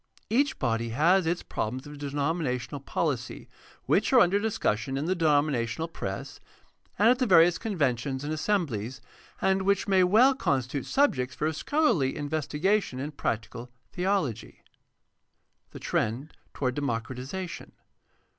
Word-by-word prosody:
Each 275 +5 +2
body 115 -2 -1
has 165 +9 +3
its 175 +2 -1
problems 125 +6 -4
of 145 - -9
denom 145 +3 -1
inational 135 -1 -3
poKcy. - - -3 0.4
which - - +2
are 260 - +7
under 200 -1 +4
discussion 135 - -1
in 140 - -2
the 185 +3 0
denomina 150 -5 +2
tional 160 +8 -5
press, - - -5 0.6
and 210 - +4
at 250 +1 +3
the 255 - +1
various 175 -2 +5
conventions 140 - -1
and 150 +2 -3
assemblies, 140 - -1 0.4
and 190 0 +2
which 200 0 +1
may 190 -2 +4
well 225 +9 +5
constitute 135 - -1
subjects 135 - +1
for 155 +1 -1
scholarly 170 - +1
investi 150 0 -3
gation 195 -7 +1
in 145 +3 -4
practical 115 -2 -4 0.2
theology. 180 - -2 1.1
The - - -10
trend 130 +8 -2 0.2
toward 130 -2 -1
democratization. 130 +7 -4
150 Hz, 135 wpm, -27 LUFS, 130-190 Hz, 1.1 s, are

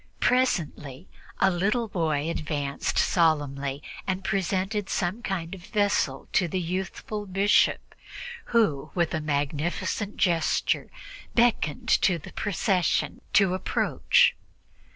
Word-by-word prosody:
Presently 170 - 0 0.3
a 190 - +4
little 210 +6 0
boy 160 -6 -1
advanced 145 -4 -2
solemnly 145 -4 +1 0.2
and 190 0 -2
presented 195 +1 -1
some 185 +6 -1
kind 180 -5 -3
of 185 -3 -9
a - - -16
vessel 200 - 0
to 180 - +3
the 185 +3 -2
youthful 190 +4 -4
bishop, 195 +2 +2 0.5
who, 205 - +1
with 170 -3 +1
a 155 - -1
magnificent 150 +7 -2
gesture, 170 -4 +1 0.5
beckoned 230 -11 +2
to 180 -3 +3
the 155 - -11
procession 180 -6 0
to 195 -3 +4
approach. 185 - +2
180 Hz, 110 wpm, -26 LUFS, 155-200 Hz, 0.5 s, a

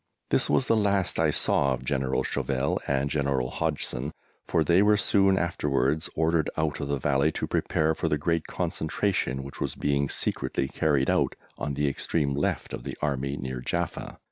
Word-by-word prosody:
This - - +2
was 130 - +2
the 115 - +4
last 100 -5 +1
I 80 -1 +3
saw 70 -2 +2
of 65 - -11
General 65 0 0
Chauvel 70 0 -1
and 70 0 +1
General 70 -3 0
Hodgson, 70 +5 -2 0.3
for 80 - +2
they 85 +4 +4
were 105 0 +5
soon 95 -1 +3
afterwards 75 -3 0
ordered 80 0 +2
out 80 -2 0
of 70 - -3
the 70 0 0
Valley 70 +3 +2
to - - -2
prepare 80 +1 +1
for - - -2
the 75 - +1
great 80 +2 -1
concentration 80 -5 -1
which 70 - -10
was - - -2
being 70 -1 0
secretly 65 - 0
carried 70 -2 +1
out - - +1 0.2
on 70 -1 -2
the 75 +1 +1
extreme 70 +1 0
left 70 - -1
of - - -5
the - - -6
Army 70 -1 -1
near 65 -1 -4
Jaffa. - - -3
75 Hz, 180 wpm, -27 LUFS, 70-80 Hz, 0.3 s, were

